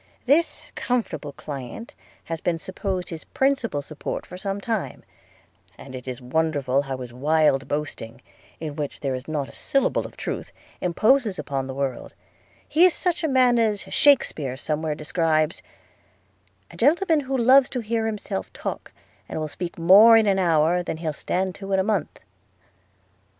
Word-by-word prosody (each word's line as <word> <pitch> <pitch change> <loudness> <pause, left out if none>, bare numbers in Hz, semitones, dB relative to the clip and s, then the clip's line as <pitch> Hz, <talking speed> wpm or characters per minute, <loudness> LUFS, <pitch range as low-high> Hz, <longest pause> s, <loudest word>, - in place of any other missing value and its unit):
– - - -38
This 300 +6 +2
comfortable 165 - -2
client 140 - -8 0.3
has 165 0 -5
been 175 -2 0
supposed 185 +1 -4
his 165 -2 -7
principal 265 - 0
support 155 +1 -5
for - - -10
some 195 +2 -3
time; 220 0 -3 0.7
and 135 - -11
it 130 0 -8
is 125 -1 -5
wonderful 140 0 0
how 135 -2 -5
his 125 -2 -8
wild 145 0 +2
boasting, 145 -6 -4 0.4
in 155 -2 -5
which 145 -2 -5
there 135 -2 -1
is 130 +1 -6
not 150 -3 -2
a - - -14
syllable 275 - 0
of - - -18
truth, - - -5 0.3
imposes 215 +4 +2
upon 135 -2 -3
the 130 - -6
world 135 -3 -3 0.3
– - - -33
He 325 - +3
is 365 -2 +6
such 350 -1 -1
a - - +2
man 255 -3 +4
as 215 -3 +1
Shakespeare 155 - +2
somewhere 155 +2 -2
describes 155 0 0 0.6
– 95 0 -29
'A - - -13
gentleman 320 - +3
who 270 -1 -2
loves 255 +2 +6
to 250 - -3
hear 225 0 -1
himself 205 - -4
talk, - - -5 0.4
and - - -4
will 155 - -2
speak 170 +3 -6
more 200 +7 +8
in 220 - +4
an 195 -2 +2
hour 170 0 +3
than 175 - -4
he'll 160 -2 -3
stand 185 +5 -2
to 195 +1 -6
in 190 - +3
a - - +2
month.' 210 +1 -2
165 Hz, 170 wpm, -24 LUFS, 145-225 Hz, 0.7 s, more